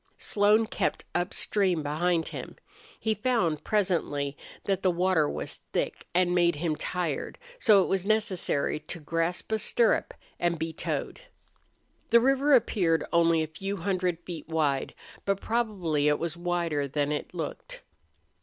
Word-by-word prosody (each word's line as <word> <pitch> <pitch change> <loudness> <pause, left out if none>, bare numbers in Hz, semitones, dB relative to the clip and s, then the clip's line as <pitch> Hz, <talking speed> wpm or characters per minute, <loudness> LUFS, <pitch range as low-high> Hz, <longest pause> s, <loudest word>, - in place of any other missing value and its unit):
Slone 210 +2 +3
kept - - -2
upstream 180 -1 0
beside 165 +3 0
him. - - -7 0.4
He 220 - +1
found, 200 - 0
presently, 165 -9 0 0.3
that 195 -1 0
the 185 - +3
water 175 -3 +2
was - - -4 0.2
thick - - -2
and 180 0 +3
made 175 -2 +3
him 155 +1 -1
tired, 175 -2 -3 0.2
so 205 - +6
it - - -3
was 190 -2 0
necessary 200 -9 0
to 155 +3 -7
grasp 165 +5 -2
a 220 - +1
stirrup 230 +1 +1 0.2
and 170 -1 +1
be 160 +1 -3
towed. 330 - -3 0.9
The 235 - +7
river 270 +4 +3
appeared 175 - +2
only 165 -1 +4
a - - -4
few 195 +6 -5
hundred 180 -1 0
feet 165 -3 -8
wide, 150 -4 0 0.3
but 195 -1 0
probably 190 -12 0
it 150 0 +3
was 170 -1 -3
wider 170 -4 -1
than 145 +1 -1
it 150 - -4
looked. - - -6
175 Hz, 145 wpm, -28 LUFS, 160-200 Hz, 0.9 s, The